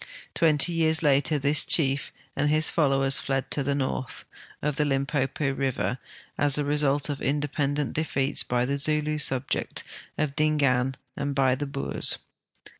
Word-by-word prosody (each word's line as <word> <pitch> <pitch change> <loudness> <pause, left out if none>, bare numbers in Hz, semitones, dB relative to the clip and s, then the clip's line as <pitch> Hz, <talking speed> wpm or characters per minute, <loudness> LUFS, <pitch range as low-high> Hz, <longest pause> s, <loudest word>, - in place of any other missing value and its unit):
Twenty 160 +1 +2
years 160 -1 +1
later 145 +1 +3
this 145 +2 +3
chief 140 -3 +2 0.2
and 145 +1 0
his 155 +1 +5
followers 135 -3 +3
fled 135 -1 -3
to 145 - +3
the 140 +1 -1
north 130 -2 -4 0.3
of 150 -1 -2
the 150 - +2
Limpopo 140 0 -1
river, 135 -1 -2 0.4
as 145 -1 +2
the 150 - +1
result 145 -1 +1
of 145 -2 -5
independent 145 0 -2
defeats 140 -3 0
by 125 0 -1
the 140 +2 -2
Zulu 150 +1 +1
subjects 130 -2 0 0.3
of 145 -2 -2
Dingaan 140 -4 +1 0.2
and 140 0 -4
l)y 130 -1 +3
the 145 +2 -4
Boers. 140 0 -1
140 Hz, 150 wpm, -25 LUFS, 135-150 Hz, 0.4 s, his